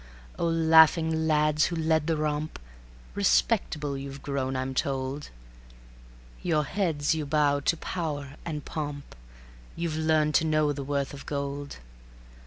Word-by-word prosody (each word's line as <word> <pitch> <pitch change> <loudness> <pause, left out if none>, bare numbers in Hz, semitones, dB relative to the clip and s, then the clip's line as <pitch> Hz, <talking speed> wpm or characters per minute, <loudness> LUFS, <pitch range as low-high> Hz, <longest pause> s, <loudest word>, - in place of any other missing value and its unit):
O 170 - +1
laughing 160 0 +5
lads 150 0 +3
who 175 - -2
led 160 -1 +1
the 165 -1 +1
romp, 150 0 -2 0.6
Respectable 65 - +1
you've 135 0 -7
grown, 135 -2 -2
I'm 130 +1 -2
told; 135 +1 -2 1.1
Your 155 -4 +1
heads 160 -4 0
you 160 -1 -2
bow 145 -1 +2
to 165 +4 0
power 150 -6 -4
and 150 -3 -5
pomp, 145 -2 -5 0.6
You've 165 -2 -2
learned 155 -1 +2
to - - -2
know 155 -2 +2
the 140 0 -5
worth 140 0 -2
of 140 - -10
gold. 140 0 -4
150 Hz, 135 wpm, -27 LUFS, 140-160 Hz, 1.1 s, laughing